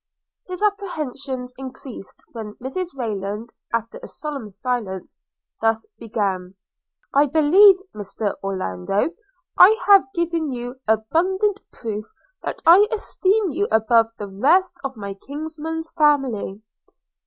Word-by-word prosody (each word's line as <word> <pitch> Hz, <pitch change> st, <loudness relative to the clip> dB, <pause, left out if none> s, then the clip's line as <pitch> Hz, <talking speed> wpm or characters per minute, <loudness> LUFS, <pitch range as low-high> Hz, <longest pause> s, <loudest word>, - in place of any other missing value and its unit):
His 365 Hz, +2 st, -4 dB
apprehensions 285 Hz, -11 st, -2 dB
increased, 260 Hz, -5 st, -8 dB
when 220 Hz, -3 st, -7 dB
Mrs 270 Hz, +9 st, -3 dB
Rayland, 210 Hz, -1 st, -3 dB, 0.2 s
after 230 Hz, 0 st, -2 dB
a -, -, -8 dB
solemn 280 Hz, -8 st, -6 dB
silence, 200 Hz, -3 st, -3 dB, 0.5 s
thus 225 Hz, 0 st, +1 dB
began: 195 Hz, -5 st, -2 dB, 0.6 s
'I 285 Hz, +2 st, +5 dB
believe, 320 Hz, +8 st, +7 dB, 0.2 s
Mr 205 Hz, 0 st, -3 dB
Orlando, 190 Hz, -, -1 dB, 0.5 s
I 435 Hz, +5 st, +8 dB
have 395 Hz, -1 st, +6 dB
given 335 Hz, -3 st, 0 dB
you 245 Hz, +1 st, -5 dB
abundant 365 Hz, -, +1 dB
proof 215 Hz, -2 st, -5 dB, 0.4 s
that -, -, -5 dB
I 365 Hz, +6 st, +8 dB
esteem 415 Hz, -3 st, +1 dB
you 395 Hz, +8 st, 0 dB
above 225 Hz, +1 st, +4 dB
the 205 Hz, -, -5 dB
rest 315 Hz, -, +3 dB
of 270 Hz, -3 st, -4 dB
my 200 Hz, -1 st, -5 dB
kinsman's 315 Hz, +7 st, -6 dB
family.' 270 Hz, -, +1 dB
260 Hz, 115 wpm, -22 LUFS, 215-335 Hz, 0.6 s, I